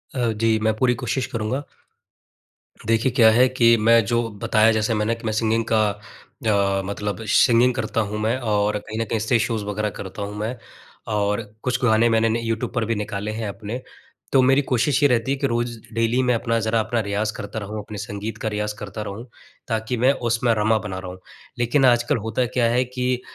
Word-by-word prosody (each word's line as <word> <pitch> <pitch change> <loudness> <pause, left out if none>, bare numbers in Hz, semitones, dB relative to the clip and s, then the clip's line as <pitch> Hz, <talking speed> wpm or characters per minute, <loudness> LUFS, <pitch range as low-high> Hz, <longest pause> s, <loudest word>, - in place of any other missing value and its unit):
अ, 120 -3 +1
जी 110 0 +1
मैं 110 0 +3
पूरी 125 +2 +2
कोशिश 125 +1 -2
करूँगा। 115 +5 -2 1.2
देखिए 115 +3 +2
क्या 115 -3 +6
है 125 +3 +5
कि 115 -2 +4
मैं 115 +1 +5
जो 120 +1 0 0.2
बताया 110 0 +4
जैसे 110 +1 0
मैंने 110 +2 0
कि 115 - -15
मैं 110 - -1
सिंगिंग 115 +1 +1
का 110 -2 +3 0.6
अ, 100 -2 +2
मतलब 105 +2 -4
सिंगिंग 120 0 +5
करता 130 -2 -1
हूँ 105 - -4
मैं 115 +4 +1
और 105 -3 0
कहीं 110 +2 -7
न - - -1
कहीं 115 - 0
स्टेज 110 +1 +2
शोज़ 115 -4 -1
वग़ैरह 105 +1 -2
करता 95 +1 -7
हूँ 100 +1 -5
मैं। 110 +4 -3 0.6
और 105 +1 0 0.2
कुछ 125 0 -1
गाने 115 0 +4
मैंने 115 0 +3
न 110 - 0
यूट्यूब 115 +2 -2
पर 120 -3 0
भी 115 0 -1
निकाले 105 0 -4
हैं 110 -1 -4
अपने। 110 +5 -6 0.5
तो 135 - +5
मेरी 135 +2 +4
कोशिश 135 +2 +1
ये 145 - +6
रहती 125 +2 +1
है 140 - 0
कि 140 0 0
रोज़ 120 0 -2 0.2
डेली 115 +2 +1
मैं 125 - +2
अपना 115 0 0
ज़रा 110 +1 +1
अपना 115 +2 -1
रियाज़ 105 +1 -2
करता 100 +2 -5
रहूँ, 105 +1 -6
अपने 105 0 -9
संगीत 105 +1 -5
का 110 - -4
रियाज़ 105 0 -2
करता 105 +1 -6
रहूँ। 105 +3 -6 0.4
ताकि 110 +2 -2
मैं 130 +4 +4 0.2
उसमें 115 0 +2
रमा 110 +1 +2
बना 95 -3 -5
रहा 90 0 -7
हूँ। 90 - -11 0.4
लेकिन 130 +3 +2
आजकल 120 +3 +3
होता 125 +2 0
क्या 120 +1 0
है 125 +2 +2
कि 125 0 -2
115 Hz, 210 wpm, -22 LUFS, 105-120 Hz, 1.2 s, क्या